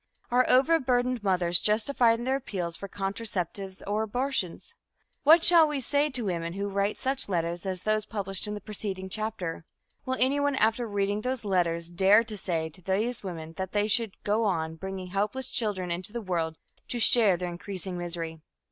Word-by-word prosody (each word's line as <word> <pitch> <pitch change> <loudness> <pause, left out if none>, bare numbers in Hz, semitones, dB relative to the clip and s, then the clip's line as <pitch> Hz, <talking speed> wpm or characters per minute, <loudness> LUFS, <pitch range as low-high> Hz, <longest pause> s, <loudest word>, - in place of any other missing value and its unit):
Are 250 +1 +3
overburdened 255 -3 +3
mothers 180 -3 +2
justified 230 +2 +3
in 240 - -5
their 265 +1 +1
appeals 180 -10 -4
for 200 - -7
contraceptives 195 -2 -3
or 210 +2 0
abortions? 245 - -2 0.5
What 320 +3 +7
shall 335 -2 +7
we 295 -2 -2
say 285 +3 +1
to 255 -5 -2
women 170 -3 -2
who 200 +2 -3
write 200 +1 0
such 265 -3 -1
letters 170 0 -2
as 185 -1 -3
those 215 0 +1
published 195 -2 -3
in 210 - -3
the 205 - -7
preceding 195 -2 -4
chapter? 210 -6 -3 0.4
Will 260 0 -2
anyone, 285 +2 +2
after 225 0 +2
reading 205 0 -1
those 250 -1 -3
letters, 170 -3 0
dare 195 +5 +5
to 225 -2 -6
say 170 -5 -2
to 170 +4 -13
these 210 +7 -1
women 165 -4 -7
that 190 -1 -4
they 205 0 +2
should 220 -2 +1
go 210 +2 +1
on 160 -5 0
bringing 190 +2 -6
helpless 210 +7 -1
children 190 -6 -1
into 180 +3 -3
the 235 - -3
world 165 -5 -2 0.3
to 240 - -3
share 220 -5 +5
their 180 0 -3
increasing 185 +1 -6
misery? 170 -2 -4
205 Hz, 180 wpm, -28 LUFS, 180-235 Hz, 0.5 s, What